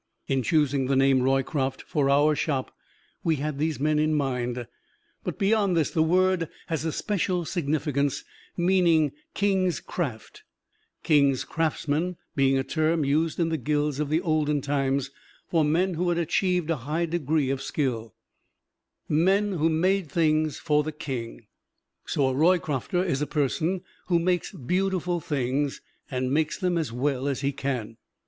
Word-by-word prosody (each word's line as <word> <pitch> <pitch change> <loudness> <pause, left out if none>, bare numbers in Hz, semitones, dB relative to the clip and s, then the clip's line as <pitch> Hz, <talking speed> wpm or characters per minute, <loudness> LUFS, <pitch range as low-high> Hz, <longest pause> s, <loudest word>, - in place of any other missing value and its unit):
In 135 -1 +1
choosing 140 0 +1
the 135 - +2
name 135 -1 +4
"Roycroft" 135 +1 0
for 140 -2 0
our 145 +2 +4
Shop 140 -3 -2 0.5
we 165 -2 +2
had 150 0 -3
these 155 -1 -1
men 150 +1 +2
in 155 0 +2
mind, 125 -4 -1 0.6
but - - -4
beyond 200 -3 +2
this 160 - +1
the 160 - +1
word 180 +1 +2 0.2
has 160 -3 -1
a 160 - 0
special 180 -2 -1
significance, 145 -3 -1 0.3
meaning 175 -4 +3 0.2
King's 190 -3 +1
Craft 130 -11 -5 0.6
King's 140 -4 +3
craftsmen 160 +2 -1 0.2
being 135 -1 +3
a 135 - +1
term 155 +2 +1
used 155 +4 +1
in 165 -1 +2
the 160 -1 -1
Guilds 150 -1 0
of 150 -2 -1
the 155 +3 +2
olden 155 -4 +1
times 135 -1 0 0.4
for 165 -2 +2
men 175 +5 +2
who 175 +2 0
had 170 - +1
achieved 175 0 +1
a 165 - 0
high 150 +7 -1
degree 155 -4 0
of 135 -1 -2
skill 120 -6 -2 0.9
men 190 +7 +2
who 165 -3 +1
made 180 +2 +1
things 155 -2 +1
for 150 -2 +2
the 155 - -3
King. 130 -7 -6 0.6
So 135 -2 +1
a - - -1
Roycrofter 165 +2 +1
is 140 -6 -1
a 150 - 0
person 160 +5 0 0.3
who 175 -2 +3
makes 175 +1 0
beautiful 180 - -1
things, 140 -1 -1 0.3
and 130 0 -1
makes 155 +1 +1
them 180 -3 0
as 155 -8 -2
well 135 +2 -1
as 140 -1 -1
he 140 0 +1
can. 125 -5 -4
150 Hz, 155 wpm, -26 LUFS, 135-170 Hz, 0.9 s, name